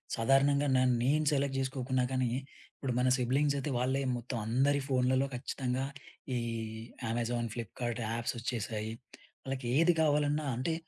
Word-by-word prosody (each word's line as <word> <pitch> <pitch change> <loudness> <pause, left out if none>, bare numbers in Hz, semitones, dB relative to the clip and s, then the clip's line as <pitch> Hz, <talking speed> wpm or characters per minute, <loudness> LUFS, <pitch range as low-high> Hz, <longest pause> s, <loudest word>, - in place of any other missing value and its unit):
సాధారణంగా 135 +4 +3
నన్ 130 -1 +4
నేను 150 +4 +2
సెలెక్ట్ 140 -1 +1
జేసుకోకున్నా 130 -1 0
గానీ 130 -1 +1 0.5
ఇప్పుడు 130 -3 -2
మన 130 - +3
సిబ్లింగ్సయితే 140 +3 +1
వాళ్ళే 130 +2 +1 0.2
మొత్తం 120 +1 -4
అందరి 135 +5 +3
ఫోన్లలో 130 0 +2
ఖచ్చితంగా 130 +1 -2 0.5
ఈ - - +1 0.7
అమెజాన్, 120 0 -1
ఫ్లిప్‌‌కార్ట్ 120 +1 -4
యాప్సొచ్చేసాయి. 115 -2 -3 0.5
వాళ్ళకి 130 -2 -4
ఏది 165 +2 +5
కావాలన్నా 150 0 +2
అంటే 130 +7 -1
130 Hz, 120 wpm, -32 LUFS, 120-140 Hz, 0.7 s, ఏది